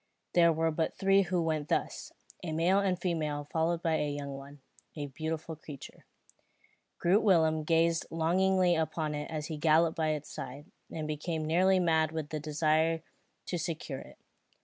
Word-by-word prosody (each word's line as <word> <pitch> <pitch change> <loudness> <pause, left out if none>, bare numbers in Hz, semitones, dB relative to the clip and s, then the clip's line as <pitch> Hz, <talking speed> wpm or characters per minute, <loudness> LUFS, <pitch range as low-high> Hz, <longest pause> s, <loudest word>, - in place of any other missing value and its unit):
There 170 -1 +6
were 160 0 +1
but 160 +1 -1
three 195 0 +4
who 180 -2 0
went 155 -2 -1
thus, - - -2 0.3
a 165 -3 -4
male 175 +5 +3
and 190 -3 0
female 155 -5 -2
followed 165 +1 0
by 160 -1 +2
a 150 - -1
young 145 -1 -4
one, 140 +1 -11 0.3
a 150 -2 -4
beautiful 160 +3 -4
creature. 150 -3 -11 0.9
Groot 190 +5 +3
Willem 160 -6 +3
gazed 165 +1 +2
longingly 180 +2 +2
upon 160 -1 -1
it 150 0 -4
as 155 -2 -4
he 155 -1 -5
galloped 160 +2 +3
by 155 -1 +1
its 150 -1 -6
side, 140 +4 -7 0.3
and 155 -1 -4
became 155 +1 -3
nearly 185 +4 +3
mad 160 -3 +2
with 155 -2 -4
the 155 - -3
desire 155 +2 +1 0.4
to 175 - -3
secure 155 -4 -4
it. - - -13
160 Hz, 170 wpm, -31 LUFS, 155-170 Hz, 0.9 s, There